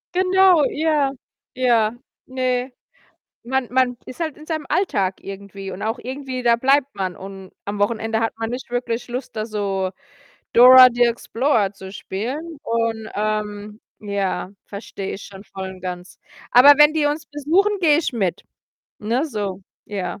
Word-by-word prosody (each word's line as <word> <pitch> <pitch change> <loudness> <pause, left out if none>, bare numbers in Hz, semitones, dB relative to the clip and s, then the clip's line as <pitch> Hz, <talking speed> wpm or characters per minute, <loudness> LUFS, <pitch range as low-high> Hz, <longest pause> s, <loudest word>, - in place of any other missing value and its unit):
Genau, 370 -4 +5
ja. 300 -3 +1 0.4
Ja, 235 -4 +2 0.3
ne. 255 0 -1 0.7
Man 260 0 -1
man 250 -1 +2
ist 255 - -10
halt 315 -4 -2
in 305 +1 -14
seinem 315 -2 -3
Alltag 195 - 0
irgendwie 195 0 -8
und 185 - -7
auch 225 +3 -2
irgendwie, 260 0 -5
da 235 -1 +5
bleibt 275 +3 +2
man 190 -3 -3
und 190 -1 -10
am 205 0 -4
Wochenende 225 +1 0
hat 225 - 0
man 225 0 -3
nicht 250 0 -6
wirklich 245 -1 -3
Lust, 245 0 -6
da 215 0 -2
so 195 -3 -2 0.6
Dora 255 +1 +10
the 245 - +1
Explorer 235 -2 0
zu 190 -1 -11
spielen 270 - -5
und, 230 -1 -1
ähm, 210 0 -3 0.2
ja, 200 -3 -2
verstehe 200 -1 -7
ich 195 - -9
schon 195 +1 -12
voll 190 -1 -7
und 185 - -12
ganz. 180 0 -7 0.3
Aber 265 +4 +9
wenn 295 +1 +7
die 305 -2 +1
uns 295 +1 -2
besuchen, 345 +8 +1
gehe 310 -3 +4
ich 330 - -2
mit, 190 -6 -1 0.5
ne, 235 +6 0
so. 200 -7 -4 0.3
Ja. 190 -2 -4
235 Hz, 155 wpm, -21 LUFS, 200-270 Hz, 0.7 s, Dora